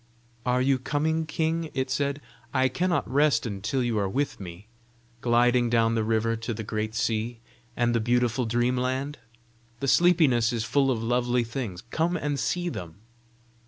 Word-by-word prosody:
"Are 125 +1 +2
you 135 0 +2
coming, 155 +4 -1
king?" 160 +1 -1
it 130 0 -1
said. 140 +1 -1 0.3
"I 130 0 +3
cannot 175 +6 0
rest 140 -3 +2
until 110 +5 -2
you 115 -3 0
are 100 -1 0
with 140 +8 -2
me, 90 +2 -9 0.5
gliding 120 0 +3
down 115 -1 +3
the 115 -1 +1
river 115 +1 +1
to 115 0 -4
the 110 - -5
great 110 +1 -3
sea, 115 +1 -1 0.4
and 120 0 +2
the 115 - +2
beautiful 120 +1 +1
dream 120 +2 +1
land. 130 +3 -2 0.6
The 135 - -2
sleepiness 145 -8 +4
is 115 -2 -1
full 135 +3 +2
of 115 -4 0
lovely 120 +1 +1
things: 115 -6 -5
come 170 +2 +1
and 145 -2 -2
see 175 +6 -1
them." 90 - -6
125 Hz, 165 wpm, -26 LUFS, 115-140 Hz, 0.6 s, sleepiness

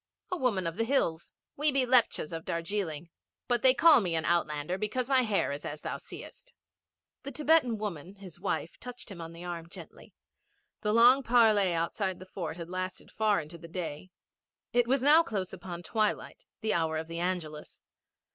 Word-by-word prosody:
'A 365 - 0
woman 225 - 0
of 165 +2 -3
the 225 - +1
hills. 200 -10 0 0.2
We 295 +1 +2
be 270 -2 +2
Lepchas 240 -10 +2
of 165 0 -5
Darjeeling, 170 -2 -3 0.4
but 245 -2 +1
me 260 - +6
they - - +6
call 325 -8 +7
an 165 -2 0
outlander 170 +1 0
because 240 +4 -2
my 265 -1 +4
hair 215 - 0
is 145 +1 -5
as 150 +1 -6
thou - - -4
seest.' - - -11 0.7
The 275 - -7
Thibetan 285 -4 +3
woman, 195 -3 -5
his 195 -4 -12
wife, 160 - -3
touched 245 -3 -8
him 175 -3 -8
on 165 0 -7
the 170 +1 -10
arm 170 -1 -6
gently. - - -12 0.7
The 210 - 0
long 240 +4 +6
parley 220 -6 +4
outside 185 +3 -1
the 185 - -11
fort 180 -3 -5
had 170 -1 -6
lasted 185 0 -5
far 215 -4 +2
into 160 +3 -11
the 165 - -10
day. 170 0 -6 0.6
It 245 -1 +3
was 260 +1 +2
now 300 +4 +7
close 195 - -3
upon 175 -2 -7
twilight 220 - -1 0.2
the 220 -1 0
hour 160 -2 0
of 160 - -3
the 165 +1 -6
Angelus. 170 -4 -4
190 Hz, 185 wpm, -30 LUFS, 170-240 Hz, 0.7 s, call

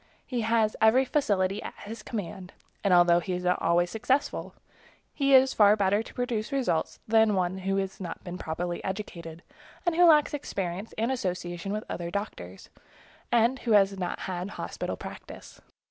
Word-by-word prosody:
He 245 -3 -2
has 225 -1 +2
every 230 +5 +5
facility 205 -8 0
at - - -7
his 220 +1 -8
command, 190 -4 -6 0.3
and 200 - +2
although 175 -1 +6
he 185 +1 -4
is 180 0 -3
not 180 0 +1
always 175 +1 +2
successful, 260 +6 -1 0.6
he 275 -2 +4
is 265 0 +5
far 210 -1 +6
better 200 -1 +2
able 220 - -2
to - - -13
produce 240 -4 -2
results 255 -12 -1
than 220 0 +4
is 210 - +1
one 185 0 0
who 195 +1 -1
has 195 -1 -3
not 175 -3 -6
been 180 0 -7
properly 175 +2 -4
educated, 170 -4 -6 0.4
and 345 - +2
who 350 +1 +6
lacks 305 -3 +5
experience 195 -8 -4
and 230 +4 0
association 180 -5 -3
with 215 +1 -2
other 170 -1 -4
doctors, 95 - -6 0.6
and 240 +2 +3
who 230 - 0
has 200 -1 +4
not 180 -1 -3
had 185 0 -4
hospital - - -4
practice. - - -10
200 Hz, 175 wpm, -27 LUFS, 180-230 Hz, 0.6 s, although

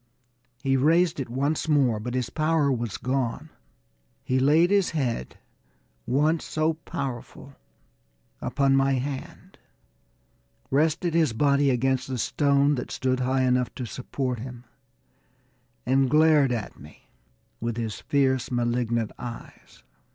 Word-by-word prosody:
He 135 -1 +2
raised 165 +4 +3
it 130 - -4
once 140 +6 -1
more, 130 -7 +3
but 120 +3 -5
his 125 -2 -2
power 155 -1 +1
was 120 -5 -2
gone. 135 +3 -2 0.7
He 130 +1 0
laid 155 +7 +4
his 200 -2 +3
head, 120 - -2 0.7
once 150 +6 +1
so 155 +1 0
powerful, 140 -4 -7 0.9
upon 135 -1 +1
my 135 0 +3
hand, 135 +1 -5 1.1
rested 160 +4 +1
his 160 -7 +2
body 140 +3 +3
against 130 0 0
the 130 -1 -3
stone, 140 +3 +2
that 125 - -5
stood 130 0 -1
high 130 +1 +1
enough 125 -1 +1
to 125 - -4
support 125 +1 -4
him, 125 0 -8 1.2
and 130 +1 +2
glared 150 -2 +4
at 115 -4 -4
me 75 +2 -16 0.5
with 115 0 -3
his 110 -3 -4
fierce, 130 -3 +1
malignant 120 -2 -1
eyes. 120 -1 -10
135 Hz, 125 wpm, -25 LUFS, 125-145 Hz, 1.2 s, laid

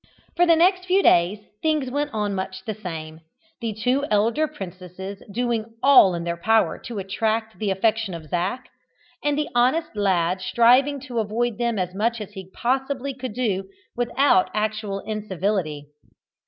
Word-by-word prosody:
For 350 0 +4
the 335 - +6
next 365 +2 +3
few 380 +2 +3
days 190 +5 +3 0.2
things 305 -5 0
went 290 +2 -1
on 210 -3 -1
much 190 +2 -5
the 220 - -2
same, 160 -6 -7 0.4
the 230 -3 -2
two 250 +6 0
elder 230 +9 +2
princesses 190 - -8
doing 230 0 -2
all 260 -10 +7
in 170 - -4
their 170 0 -3
power 225 +2 +2
to 235 -3 -6
attract 220 +3 -2
the 215 -2 -1
affection 210 0 0
of 165 -2 -8
Zac, 185 - -2 0.6
and 290 0 +1
the 300 - -1
honest 255 +4 +2
lad 185 -3 +1
striving 255 +8 +4
to 250 -3 -4
avoid 225 +2 -1
them 235 -2 0
as 180 -1 -2
much 230 +4 0
as 210 -1 -7
he 190 -2 -9
possibly 265 +3 -1
could 255 -4 -6
do 195 -6 -1 0.3
without 245 -4 +3
actual 210 -2 -2
incivility. 190 -7 -2
220 Hz, 160 wpm, -23 LUFS, 190-255 Hz, 0.6 s, all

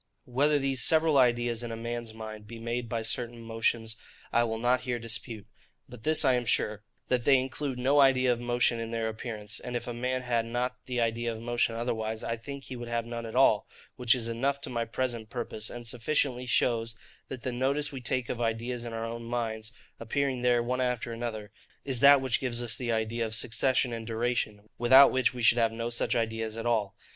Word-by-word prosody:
Whether 145 +4 +2
these 135 -2 0
several 160 -3 +4
ideas 120 -2 +2
in 120 -1 -5
a - - -3
man's 115 0 -4
mind 110 -1 -8
be 115 - -8
made 115 +1 -3
by 115 -1 -2
certain 120 +1 -3
motions, 115 0 -1 0.4
I 120 - +4
will 110 -1 -2
not 120 +2 +2
here 125 -1 -2
dispute; 115 -2 -6 0.4
but 125 -2 -11
this 155 +3 +3
I 130 - +5
am 125 -1 0
sure, 105 0 +1 0.3
that 125 -2 +2
they 135 0 +6
include 130 +1 -3
no 135 +4 +3
idea 130 -2 +5
of 120 - -5
motion 120 -1 +1
in 115 0 -4
their 115 -1 -1
appearance; 110 -2 -5
and 125 - -6
if 120 - -2
a 120 - -4
man 125 +2 -2
had 120 -2 0
not 125 +2 -3
the 125 -1 -1
idea 115 0 0
of 110 - -6
motion 120 0 0
otherwise, 110 -2 -2
I 115 - -1
think 140 +4 -8
he 130 - -7
would 120 -1 -7
have 120 -1 -1
none 115 -1 -5
at 110 - -8
all, 125 -5 +4 0.3
which 125 -1 +3
is 115 -2 -2
enough 135 +5 0
to 140 - -6
my 120 -1 -1
present 115 -2 -3
purpose; 115 -3 -4
and 120 0 -8
sufficiently 125 +1 -1
shows 115 -1 +1 0.3
that 130 -3 -7
the 130 - -1
notice 140 +4 0
we 135 -2 -6
take 125 0 -1
of 120 - -4
the - - 0
ideas 120 +2 -2
of 115 - -6
our 115 0 -3
own 115 0 -5
minds, 110 -2 -2 0.3
appearing 130 +2 -1
there 120 -1 +3
one 125 +2 -1
after 125 -2 -1
another, 110 -3 -5 0.3
is 130 -4 +1
that 140 +1 +8
which 130 -3 +1
gives 120 -2 -2
us 115 - -1
the 120 -2 -2
idea 115 +1 -1
of 110 -1 -2
succession 125 +2 +1
and 115 -1 -5
duration, 115 -2 -1
without 130 +3 +8
which 130 -1 +1
we 120 - -4
should 120 +1 +6
have 115 -1 +3
no 115 +1 -4
such 120 - 0
ideas 115 -1 -2
at 115 - -4
all. 110 -5 0
120 Hz, 220 wpm, -29 LUFS, 115-125 Hz, 0.4 s, that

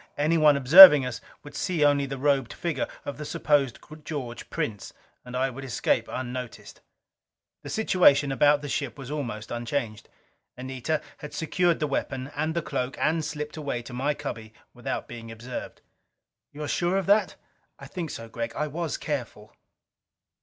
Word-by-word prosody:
Anyone 150 -1 +4
observing 150 +1 +10
us 125 -3 -5 0.2
would 145 - -12
see 170 -6 0
only 140 -1 +2
the 135 0 -5
robed 135 -3 +1
figure 165 -6 -3 0.2
of 145 - -6
the - - -4
supposed 145 -4 +1 0.3
George 130 -7 -6
Prince, 105 -3 -4 0.3
and 125 0 -6
I 135 +1 0
would 135 +2 -9
escape 125 -3 0
unnoticed. 125 -1 -7 0.8
The - - -9
situation 150 -10 +3
about 145 +2 +3
the - - -4
ship 135 -4 -3
was 135 0 -8
almost 120 -8 -5
unchanged. 120 -2 -4 0.5
Anita 130 +4 -3 0.2
had 150 0 -9
secured 170 +1 +1
the 155 - 0
weapon 135 -1 -3
and 155 +2 -2
the 170 - -1
cloak 125 +1 -3
and 160 +1 +1
slipped 150 0 -5
away 140 -5 -4
to 120 - -10
my 140 +4 -1
cubby 110 -7 -7 0.2
without - - -5
being 115 -1 -9
observed. 120 +3 -8 0.7
"You're 150 +1 -6
sure 175 +5 0
of 195 - -1
that?" 205 +3 +3 0.4
"I - - -11
think 170 -4 -5
so, 115 - -7
Gregg. 115 +1 -5
I 150 - -1
was 160 +2 -4
careful." 120 -7 -5
140 Hz, 160 wpm, -26 LUFS, 125-150 Hz, 0.8 s, observing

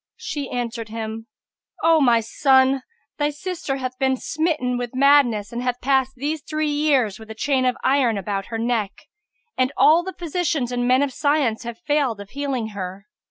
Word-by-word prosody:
She 285 -3 -5
answered 235 -2 -4
him, 225 0 -6 0.6
"O 325 -1 +5
my 240 -4 +4
son, 265 +3 +3 0.4
thy 290 0 +2
sister 295 -1 -4
hath 255 -1 -5
been 265 -1 +2
smitten 305 -4 -1
with 245 0 -4
madness 260 -7 +4
and 240 - -3
hath 250 -1 -2
passed 265 0 +1
these 295 +4 -3
three 305 0 -2
years 280 -9 +1
with 220 0 -12
a 220 - -7
chain 260 +2 +1
of 250 - +1
iron 260 -5 +2
about 195 0 -3
her 225 - -4
neck; 225 -4 -1 0.7
and 255 +1 +2
all 320 +3 +6
the 375 0 -7
physicians 320 -7 -1
and 245 0 -1
men 255 +2 +4
of 275 -2 -2
science 285 -6 +1
have 235 -1 -6
failed 280 -7 0
of 200 -1 -10
healing 270 -5 -2
her." 195 -1 -7
255 Hz, 180 wpm, -22 LUFS, 230-290 Hz, 0.7 s, all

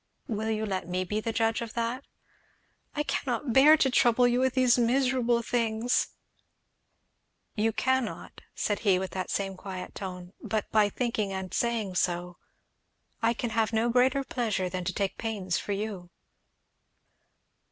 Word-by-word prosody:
"Will 220 0 -2
you 220 0 -1
let 190 -4 -3
me 180 +1 0
be 210 +4 -2
the 230 - -2
judge 225 0 +1
of 230 -1 -6
that?" 235 +3 -2 0.9
"I 295 - 0
cannot 250 -3 -2
bear 295 +5 +8
to 265 -3 +2
trouble 245 0 +4
you 245 +1 +2
with 260 0 +1
these 255 -2 +5
miserable 245 -1 +2
things 230 0 +1 0.7
" - - -49 0.7
"You 225 +1 +2
cannot," 260 0 -1
said 205 - -1
he 195 -4 +3
with 190 0 -3
that 185 -1 -4
same 195 -1 -2
quiet 185 -1 -7
tone, 180 -1 -7
"but 215 -2 -1
by 210 -2 +4
thinking 220 -3 -1
and 190 -1 -5
saying 230 -5 0
so. 175 0 -1 0.8
I 230 +1 +2
can 235 0 -3
have 225 0 +1
no 225 +2 +2
greater 255 +3 +3
pleasure 215 -8 -1
than 180 0 -4
to 190 - 0
take 195 0 -2
pains 200 -6 -2
for - - -5
you." 195 -3 -4
220 Hz, 160 wpm, -28 LUFS, 195-240 Hz, 0.9 s, bear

